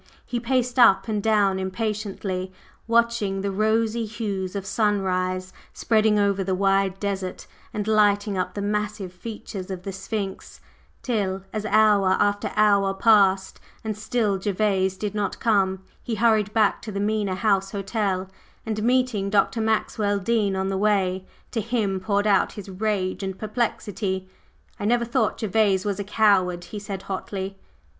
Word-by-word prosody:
He 245 - -2
paced 250 +1 0
up 235 -4 +6
and 210 -2 -1
down 200 -3 +2
impatiently, 190 -2 -3 0.4
watching 230 -4 +1
the 200 0 -2
rosy 220 +3 +1
hues 200 -4 -4
of 195 -1 -3
sunrise 185 -3 0 0.2
spreading 215 -1 +2
over 200 -1 +2
the 190 0 -1
wide 195 0 +1
desert 195 -2 -3 0.3
and 210 0 -3
lighting 205 -1 +3
up 185 -1 -2
the 200 - -3
massive 210 -2 -2
features 205 -1 -7
of 185 -2 -5
the 195 - -4
Sphinx, 195 0 -5 0.4
till 195 -6 -1
as 215 0 -3
hour 210 -4 +4
after 205 0 +1
hour 200 -2 +3
passed 195 -3 +3 0.2
and 220 -1 -3
still 215 -2 0
Gervase 190 -1 0
did 205 +1 -3
not 205 -2 -2
come, 190 -4 +1 0.2
he 230 - -3
hurried 215 -2 +2
back 215 -2 +2
to 215 - -7
the 200 - -3
Mena 205 -2 0
House 195 -1 +1
Hotel, 195 -2 -2 0.4
and 215 -1 -2
meeting 245 -4 +1
Dr. 205 +3 +2
Maxwell 215 -2 0
Dean 200 -1 +1
on 190 0 -1
the 195 -1 -1
way, 190 -3 +1 0.2
to 225 - -1
him 210 -4 -1
poured 200 +1 0
out 205 -2 +3
his 205 -2 -9
rage 190 -1 -1
and 190 -1 -4
perplexity. 205 -4 -2 0.5
"I 205 - -3
never 235 +2 +2
thought 230 -3 0
Gervase 205 -3 +2
was 205 -1 -1
a - - -1
coward!" 195 -4 +2
he 210 - -7
said 200 -2 -6
hotly. 195 0 -5
205 Hz, 155 wpm, -24 LUFS, 190-215 Hz, 0.5 s, up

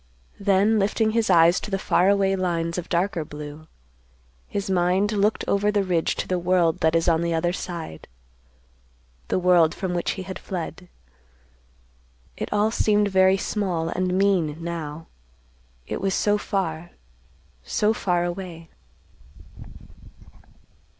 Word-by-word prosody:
Then 200 +2 +3
lifting 215 +2 +1
his 225 -1 0
eyes 170 0 +5
to - - -7
the 195 - 0
far 190 0 +2
away 195 -1 +2
lines 170 -2 -1
of 175 - -8
darker 175 -1 0
blue, 150 +1 -9 0.8
his 200 -1 -3
mind 185 +2 +1
looked 210 +1 +1
over 205 +1 +2
the 205 -1 +1
ridge 175 -3 0
to - - -4
the 180 -1 0
world 175 -2 +2
that 160 +1 +2
is 165 +1 +1
on 165 -1 +3
the 170 -1 0
other 175 +2 0
side, 170 - -7 1.2
the - - 0
world 175 -3 +4
from 190 -3 -3
which 175 - -1
he 190 - -6
had 190 0 -7
fled. 180 -1 -6 1.5
It - - -5
all 210 +1 +2
seemed 210 -2 +2
very 190 0 +4
small 180 -6 -2
and 185 0 -1
mean, 185 -6 +1
now; 165 -2 -5 0.8
it - - -5
was 195 -1 0
so 205 0 +2
far—so 160 - -4
far 175 -5 0
away. 175 -2 -6
180 Hz, 135 wpm, -24 LUFS, 165-195 Hz, 1.5 s, eyes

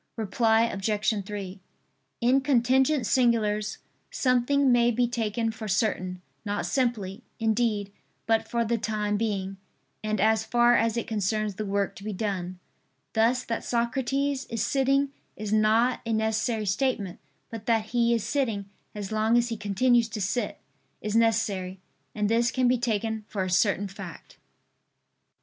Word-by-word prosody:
Reply 225 +1 +2
Obj. 215 +1 0
3: 195 -2 -6 0.6
In 255 +3 +4
contingent 265 0 +3
singulars, 215 -4 +1 0.3
something 260 +2 +2
may 240 -1 +4
be 240 +1 +2
taken 225 -1 -1
for 220 -1 -7
certain, 185 -2 -1 0.2
not 205 -1 -2
simply, 235 -6 -1 0.2
indeed, 220 -3 0 0.3
but 225 0 +1
for 235 -1 0
the 230 +1 0
time 210 -1 -1
being, 195 -3 -2 0.5
and 215 -1 -1
as 220 +2 +3
far 240 +1 +4
as 230 0 +1
it 235 - -1
concerns 215 0 -1
the 210 +2 -5
work 200 0 -1
to 195 - -11
be 215 0 -4
done. 185 -3 -3 0.6
Thus 230 +3 +2
that 230 - -3
Socrates 265 +3 -1
is 230 -2 -1
sitting 275 +1 +2 0.3
is 215 0 -4
not 220 +3 +3
a 230 - -2
necessary 220 0 0
statement; 200 -2 -1 0.3
but 225 -2 -8
that 225 -2 +1
he 235 -1 +2
is 225 - -1
sitting, 215 -5 -1 0.2
as 205 -1 -5
long 220 +2 +2
as 240 0 +2
he 230 - -2
continues 225 +3 +2
to 220 -1 -5
sit, 205 +5 -2 0.4
is 210 0 -3
necessary; 205 -5 +1 0.4
and 210 -1 0
this 235 +2 +2
can 255 -1 +1
be 250 0 +3
taken 220 -2 -1
for 195 -3 -2
a 185 - -3
certain 200 +2 +2
fact. 195 -4 -10
220 Hz, 150 wpm, -27 LUFS, 205-240 Hz, 0.6 s, In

